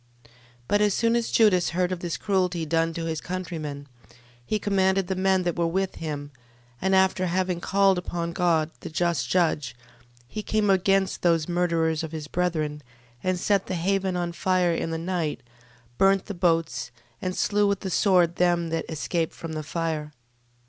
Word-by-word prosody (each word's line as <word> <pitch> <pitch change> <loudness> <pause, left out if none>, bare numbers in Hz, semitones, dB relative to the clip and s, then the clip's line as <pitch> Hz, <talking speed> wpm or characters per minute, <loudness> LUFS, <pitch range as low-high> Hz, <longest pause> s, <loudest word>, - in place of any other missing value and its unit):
12:5. 115 - -22 0.4
But 205 - +2
as 210 -2 +3
soon 230 0 +2
as 235 -1 0
Judas 195 -6 +4
heard 180 0 +1
of 185 - -2
this 175 -2 -3
cruelty 180 -4 0
done 165 +1 +1
to 165 - -3
his 160 -1 -3
countrymen, 160 -6 -5 0.6
he 215 - -1
commanded 195 -2 +1
the 190 +1 -2
men 190 0 +2
that 175 -1 -1
were 170 -1 +1
with 190 +3 -1
him: 145 -3 -5 0.5
and 190 +1 +2
after 190 -1 +3
having 180 0 -1
called 195 -1 +3
upon 170 -1 -4
God, 165 -3 +1
the - - -7
just 170 -1 0
judge, 160 -8 +1 0.5
12:6. - - -31
He 215 - -4
came 210 -1 0
against 195 0 +2
those 165 -3 +2
murderers 170 -3 +1
of 160 -1 -6
his 155 -2 -5
brethren, 155 -4 -1 0.4
and 185 -1 0
set 200 +1 +1
the 185 - -2
haven 190 +1 0
on 175 -1 -2
fire 180 0 +1
in 165 - -2
the 165 - -2
night, 170 -2 -2 0.6
burnt 195 0 +4
the 205 - -5
boats, 165 -9 0 0.3
and 185 0 -3
slew 205 0 +2
with 200 0 0
the 190 - -4
sword 175 -3 +3
them 175 -1 +2
that 165 0 -2
escaped 165 +1 -2
from 165 -1 -7
the 155 - -3
fire. 155 -1 -3
175 Hz, 185 wpm, -25 LUFS, 165-190 Hz, 0.6 s, Judas